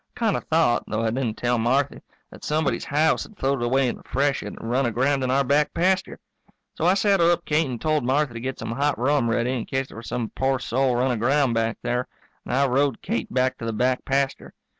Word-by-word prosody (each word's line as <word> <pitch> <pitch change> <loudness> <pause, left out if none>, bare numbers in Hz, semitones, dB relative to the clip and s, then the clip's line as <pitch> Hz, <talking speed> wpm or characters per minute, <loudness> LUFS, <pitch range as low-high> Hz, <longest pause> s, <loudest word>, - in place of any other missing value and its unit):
I - - -12
kind 225 -3 +2
of - - -4
thought, 160 -7 +2
though 110 +1 -2
I 110 - +1
didn't 120 -3 -2
tell 120 -1 0
Marthy, 130 +5 0 0.3
that - - -14
somebody's 155 -1 0
house 150 +3 +2
had 215 - -10
floated 135 -4 0
away 130 +2 +2
in - - -3
the - - -17
freshet 140 0 -1
and - - -8
run 130 +1 +2
aground 130 +4 +1
in 130 - -1
our 135 +2 +3
back 145 +3 +1
pasture. 185 +2 +1 0.6
So 165 - 0
I 185 - +5
saddled 195 -4 +3
up 175 0 +1
Kate 155 +1 +1
and 120 -2 -4
told 155 0 0
Marthy 135 +1 +1
to 115 - -6
get 130 +2 -4
some - - -5
hot 140 +4 0
rum 130 -1 +1
ready 120 +2 0
in 120 -4 -3
case 135 0 -2
there - - -12
was 115 - -9
some 120 -3 -3
poor 135 0 +1
soul 130 0 0
run 125 +2 +1
aground 130 +3 +2
back 115 0 0
there. 125 +1 -1 0.4
And - - -4
I 140 +1 +3
rode 135 -1 +1
Kate 115 - -3
back 130 0 0
to - - -5
the 115 - -2
back 125 +3 0
pasture. 135 0 -1
135 Hz, 240 wpm, -24 LUFS, 120-145 Hz, 0.6 s, I